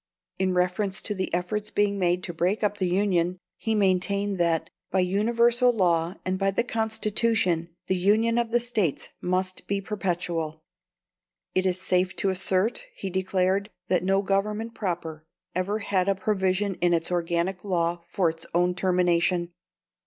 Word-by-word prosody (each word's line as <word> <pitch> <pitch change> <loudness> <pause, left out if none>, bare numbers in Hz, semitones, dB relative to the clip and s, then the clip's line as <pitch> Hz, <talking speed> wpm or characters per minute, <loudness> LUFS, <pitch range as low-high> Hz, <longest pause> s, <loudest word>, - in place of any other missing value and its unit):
In 185 -1 +1
reference 190 +3 0
to 210 - -2
the 190 -2 -3
efforts 205 +5 -2
being 205 -1 +1
made 180 0 +1
to 175 - -4
break 180 +6 0
up 205 0 0
the 185 - +1
Union, 180 -2 +1 0.2
he 225 -1 0
maintained 200 0 +1
that, 170 -2 +1 0.2
by 190 - +2
universal 235 +6 +3
law 175 -5 +1
and 185 0 -1
by 195 0 +2
the 195 - +1
Constitution, 220 -6 0 0.2
the 185 - +1
union 220 +5 +3
of 235 -1 0
the 240 +1 +3
States 225 - -1
must 185 +1 -1
be 200 0 0
perpetual. 175 -6 -3 0.9
"It 185 0 +2
is 185 0 0
safe 185 0 +1
to 195 - +1
assert," 195 - 0
he 190 - -5
declared, 190 +2 +1 0.2
"that 180 -1 +2
no 195 +1 +2
government 210 +4 -1
proper 170 -7 -4 0.3
ever 185 +4 0
had 200 -3 0
a 195 - +3
provision 190 0 0
in 175 -1 +4
its 165 +1 -2
organic 175 +1 -1
law 170 -3 0
for 180 -1 +1
its 165 0 -4
own 180 +1 +3
termination." 180 -1 +1
190 Hz, 160 wpm, -26 LUFS, 180-205 Hz, 0.9 s, in